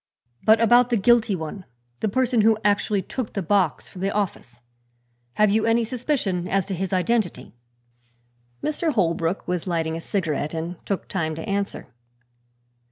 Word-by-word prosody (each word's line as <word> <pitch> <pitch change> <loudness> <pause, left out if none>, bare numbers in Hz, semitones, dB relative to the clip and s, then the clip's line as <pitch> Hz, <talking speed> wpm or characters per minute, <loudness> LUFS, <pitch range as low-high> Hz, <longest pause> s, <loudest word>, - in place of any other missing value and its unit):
"But 220 +1 +5
about 240 +2 +5
the 240 - +2
guilty 230 0 +3
one 170 +3 -6 0.4
the 215 - 0
person 250 +1 +2
who 220 0 +4
actually 205 -1 +2
took 250 +4 -5
the 195 - -2
box 180 -2 +1
from 185 - -10
the 195 - +1
office 130 - -4 0.7
have 210 +7 +3
you 215 +1 +2
any 230 +1 +3
suspicion 225 - -1
as 195 -1 +1
to 195 - -4
his 190 +1 -3
identity?" 195 - 0 1.1
Mr. 310 +1 0
Holbrook 170 - 0
was 180 0 -2
lighting 165 -2 -1
a 165 - -5
cigarette 165 -5 -2
and 165 +2 -5
took 200 - -2
time 160 -4 -2
to 160 - -7
answer. 200 -6 -3
195 Hz, 160 wpm, -24 LUFS, 170-225 Hz, 1.1 s, But